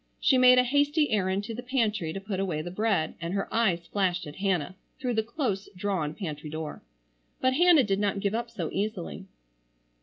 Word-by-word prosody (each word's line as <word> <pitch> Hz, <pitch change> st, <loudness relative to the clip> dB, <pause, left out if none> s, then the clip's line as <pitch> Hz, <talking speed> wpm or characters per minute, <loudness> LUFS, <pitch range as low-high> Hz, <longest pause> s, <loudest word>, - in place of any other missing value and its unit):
She 260 Hz, -, +4 dB
made 250 Hz, 0 st, +7 dB
a 250 Hz, -, +6 dB
hasty 290 Hz, +4 st, +2 dB
errand 195 Hz, -1 st, +1 dB
to 225 Hz, +2 st, -5 dB
the 240 Hz, -, -5 dB
pantry 225 Hz, -9 st, 0 dB
to 195 Hz, -, -4 dB
put 195 Hz, -1 st, -4 dB
away 170 Hz, -6 st, -1 dB
the 175 Hz, -, -6 dB
bread, 195 Hz, -5 st, 0 dB
and 170 Hz, +3 st, -3 dB
her 195 Hz, -, -1 dB
eyes 190 Hz, -7 st, +1 dB
flashed 185 Hz, -3 st, 0 dB
at 150 Hz, 0 st, -9 dB
Hannah 185 Hz, -3 st, -1 dB, 0.2 s
through 250 Hz, -2 st, -1 dB
the 220 Hz, -, +2 dB
close 220 Hz, -4 st, -3 dB
drawn 180 Hz, -6 st, -1 dB
pantry 155 Hz, -6 st, -5 dB
door. 155 Hz, 0 st, -6 dB, 0.6 s
But 260 Hz, 0 st, +2 dB
Hannah 335 Hz, -1 st, +6 dB
did 195 Hz, -2 st, 0 dB
not 205 Hz, -1 st, 0 dB
give 200 Hz, +1 st, -1 dB
up 235 Hz, +1 st, -2 dB
so 185 Hz, -9 st, -4 dB
easily. 195 Hz, -2 st, -3 dB
200 Hz, 200 wpm, -28 LUFS, 180-235 Hz, 0.6 s, made